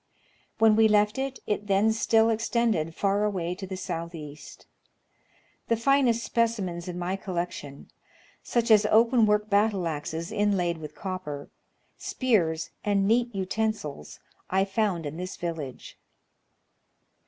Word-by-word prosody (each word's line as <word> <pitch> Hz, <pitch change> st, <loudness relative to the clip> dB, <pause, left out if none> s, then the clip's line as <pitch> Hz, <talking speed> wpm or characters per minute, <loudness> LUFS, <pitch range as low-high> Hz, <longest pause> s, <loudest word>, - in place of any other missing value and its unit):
When 220 Hz, -1 st, +5 dB
we 220 Hz, 0 st, +6 dB
left 210 Hz, +2 st, +2 dB
it, 270 Hz, 0 st, -3 dB
it 205 Hz, 0 st, -2 dB
then 205 Hz, +3 st, +3 dB
still 225 Hz, 0 st, +3 dB
extended 225 Hz, -7 st, 0 dB
far 200 Hz, +1 st, +1 dB
away 180 Hz, -5 st, -1 dB
to 190 Hz, +1 st, -7 dB
the 190 Hz, 0 st, -5 dB
south 170 Hz, -2 st, -5 dB
east. 150 Hz, -2 st, -10 dB, 1.0 s
The 230 Hz, -, +2 dB
finest 240 Hz, -1 st, +3 dB
specimens 200 Hz, -7 st, -1 dB
in 180 Hz, -1 st, -5 dB
my 180 Hz, +2 st, -2 dB
collection, 175 Hz, -7 st, -5 dB, 0.5 s
such 235 Hz, -1 st, 0 dB
as 210 Hz, -1 st, +6 dB
open 230 Hz, +1 st, +4 dB
work 210 Hz, 0 st, +2 dB
battle 205 Hz, -3 st, +2 dB
axes 160 Hz, +2 st, -4 dB
inlaid 185 Hz, -5 st, +1 dB
with 150 Hz, -1 st, -9 dB
copper, 185 Hz, -7 st, -6 dB, 0.5 s
spears, 170 Hz, -, 0 dB
and 200 Hz, -1 st, +2 dB
neat 235 Hz, +1 st, +2 dB
utensils, 190 Hz, -, -3 dB, 0.3 s
I 190 Hz, +1 st, +2 dB
foi; 210 Hz, +2 st, +1 dB
nd 165 Hz, -, -8 dB
in 145 Hz, +2 st, -5 dB
this 180 Hz, +1 st, -6 dB
village. 165 Hz, -7 st, -6 dB
200 Hz, 135 wpm, -27 LUFS, 170-220 Hz, 1.0 s, we